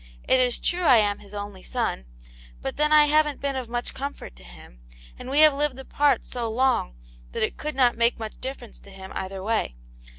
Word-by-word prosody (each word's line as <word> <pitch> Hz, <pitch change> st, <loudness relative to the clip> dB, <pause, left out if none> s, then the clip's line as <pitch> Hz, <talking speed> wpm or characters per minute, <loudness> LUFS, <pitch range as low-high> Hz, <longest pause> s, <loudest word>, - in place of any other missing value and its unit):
It 260 Hz, -, +4 dB
is 250 Hz, -1 st, +2 dB
true 355 Hz, +1 st, 0 dB
I 260 Hz, -5 st, +7 dB
am 205 Hz, -2 st, +2 dB
his 200 Hz, -, -15 dB
only 205 Hz, -2 st, -7 dB
son, 65 Hz, -, -3 dB, 0.5 s
but -, -, -5 dB
then 300 Hz, +1 st, +2 dB
I 305 Hz, -1 st, +8 dB
haven't 300 Hz, -1 st, +2 dB
been 280 Hz, -1 st, -2 dB
of 255 Hz, -3 st, -4 dB
much 240 Hz, 0 st, -3 dB
comfort 280 Hz, -, -7 dB
to 60 Hz, -, -14 dB
him, -, -, -15 dB, 0.4 s
and 250 Hz, -, -8 dB
we 285 Hz, +3 st, +3 dB
have 310 Hz, -2 st, +7 dB
lived 285 Hz, -2 st, -1 dB
apart 285 Hz, +2 st, +1 dB
so 235 Hz, -2 st, -4 dB
long 245 Hz, -, +1 dB, 0.4 s
that -, -, -1 dB
it -, -, -1 dB
could 305 Hz, -1 st, -5 dB
not 250 Hz, -3 st, +3 dB
make 235 Hz, +1 st, +2 dB
much 220 Hz, -1 st, -8 dB
difference 255 Hz, -2 st, -7 dB
to -, -, -16 dB
him 190 Hz, -1 st, -11 dB
either 190 Hz, 0 st, -5 dB
way. 215 Hz, -, -1 dB
245 Hz, 210 wpm, -25 LUFS, 205-280 Hz, 0.5 s, I